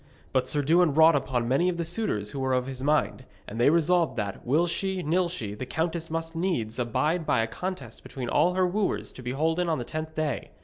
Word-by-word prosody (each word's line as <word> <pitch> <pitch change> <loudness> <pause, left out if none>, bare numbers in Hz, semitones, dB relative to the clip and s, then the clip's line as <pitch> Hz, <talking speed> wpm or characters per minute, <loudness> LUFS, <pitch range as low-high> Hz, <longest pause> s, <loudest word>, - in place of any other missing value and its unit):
But 130 -1 +1
Sir 145 -1 +1
Dewin 165 0 +3
wrought 160 0 +7
upon 125 -4 -1
many 140 +9 +2
of 175 - -2
the 170 - -2
suitors 160 - -2
who 140 - -5
were 130 -1 0
of 125 0 +1
his 130 -1 -6
mind, 145 -2 +1 0.2
and 115 +3 -4
they 125 - +6
resolved 165 -3 +2
that, 100 -3 -4
will 150 +8 +2
she, 185 +2 -2
nill 175 +3 +1
she, 115 - -5
the 125 +5 -6
countess 165 +2 -2
must 165 +1 -4
needs 130 - -1
abide 150 +8 0
by 115 - +2
a - - +1
contest 140 -4 -6
between 130 -3 -6
all 170 +9 +2
her 185 0 +3
wooers 195 +3 -1
to - - -11
be 125 - -5
holden 160 +6 0
on 160 - +1
the 120 - -4
tenth 155 +2 -5
day. 155 -2 -2
155 Hz, 230 wpm, -27 LUFS, 130-170 Hz, 0.2 s, wrought